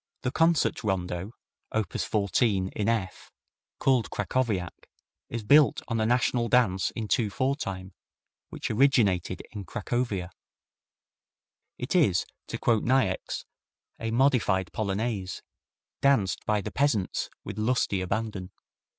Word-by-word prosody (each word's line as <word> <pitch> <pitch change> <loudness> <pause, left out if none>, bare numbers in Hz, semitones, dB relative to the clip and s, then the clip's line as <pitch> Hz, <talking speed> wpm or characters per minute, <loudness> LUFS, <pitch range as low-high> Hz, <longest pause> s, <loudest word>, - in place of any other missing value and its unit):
The 125 - 0
Concert 165 -3 +2
Rondo, 95 0 -2 0.4
op. 110 -2 -1
14, 100 +1 +1
in 105 +2 -1 0.2
F, - - -18 0.5
called 130 -4 +2
Krakowiak, 105 -4 -2 0.4
is 115 -2 -4
built 140 +2 +5
on 115 -1 0
a 110 - +2
national 120 -1 +2
dance 110 -7 +3
in 110 -2 -3
two 110 0 +1
four 130 +8 0
time, 95 - -6 0.6
which - - -4
originated 105 -8 +2
in 105 -2 -6
Cracovia. 105 -2 -2 1.5
It 125 +8 -3
is, 100 - +3 0.2
to - - -4
quote 115 -3 +2
Niecks, 120 -8 0 0.5
a 115 - -2
modified 115 -7 +2
polonaise, 100 -2 -2 0.6
danced 135 -9 +2
by 105 -1 +2
the - - -5
peasants 125 -9 0
with 105 +1 -6
lusty 110 -4 +1
abandon. 100 0 -3
110 Hz, 120 wpm, -27 LUFS, 95-125 Hz, 1.5 s, built